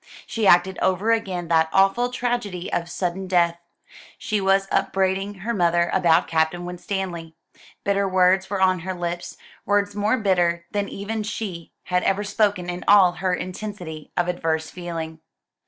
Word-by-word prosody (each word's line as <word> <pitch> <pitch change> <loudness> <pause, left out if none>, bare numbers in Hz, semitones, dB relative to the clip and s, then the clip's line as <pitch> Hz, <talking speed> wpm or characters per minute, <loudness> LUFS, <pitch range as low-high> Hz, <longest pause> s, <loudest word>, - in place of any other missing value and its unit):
She 220 -3 -1
acted 180 +1 +4
over 190 +5 +2
again 190 -6 -1
that 160 -1 +3
awful 195 +6 +3
tragedy 240 -7 -3
of 170 0 -1
sudden 185 +1 -3
death. 170 -2 +2 0.6
She 210 -2 -2
was 195 0 +2
upbraiding 195 +1 0
her 235 +4 -2
mother 175 -3 +2
about 170 -2 +3
Captain 165 +2 0
Winstanley. 180 -2 -5 0.5
Bitter 200 0 +1
words 185 +1 +3
were 200 -1 -2
on 185 -1 +3
her 185 +2 -4
lips; 175 0 -4 0.3
words 205 0 +1
more 210 +4 +1
bitter 175 -5 +1
than 205 -1 -2
even 215 +2 -4
she 205 -6 -5
had 180 0 0
ever 195 +2 +1
spoken 205 -3 0
in 180 0 -4
all 195 -3 +7
her 185 0 -1
intensity 180 -5 -7
of 175 0 +1
adverse 160 -3 -1
feeling. 165 -3 -6
185 Hz, 155 wpm, -23 LUFS, 175-200 Hz, 0.6 s, all